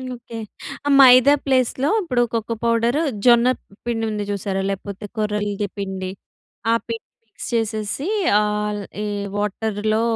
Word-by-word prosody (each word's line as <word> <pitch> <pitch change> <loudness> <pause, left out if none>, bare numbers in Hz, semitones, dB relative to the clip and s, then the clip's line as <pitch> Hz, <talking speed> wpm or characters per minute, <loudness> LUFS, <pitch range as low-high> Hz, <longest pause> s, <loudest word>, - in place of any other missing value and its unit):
Okay. 235 -1 -10 0.5
ఆ - - +2
మైదా 255 +2 +8
place 255 -3 +2
లో 290 - +3
ఇప్పుడు 255 -10 0
కోకో 230 0 -1
పౌడరు, 235 +5 +2 0.2
జొన్న 240 0 +6 0.4
పిండి 225 -2 -1
ఉంది 210 -1 -2
చూసారా? 195 -1 -2
లేకపోతే 200 +1 -5
కొర్రల‌ది 210 -1 -1
పిండి, 190 -2 -4 0.6
ఆ - - +5
పిండి 230 -1 -5 0.2
మిక్స్ 215 - -9
చేసేసి 220 - -1 0.3
ఆల్, 210 0 -1 0.2
ఈ - - -2 0.3
వాటర్‌ 210 +1 -2
లో 220 - +2
220 Hz, 135 wpm, -21 LUFS, 205-235 Hz, 0.6 s, మైదా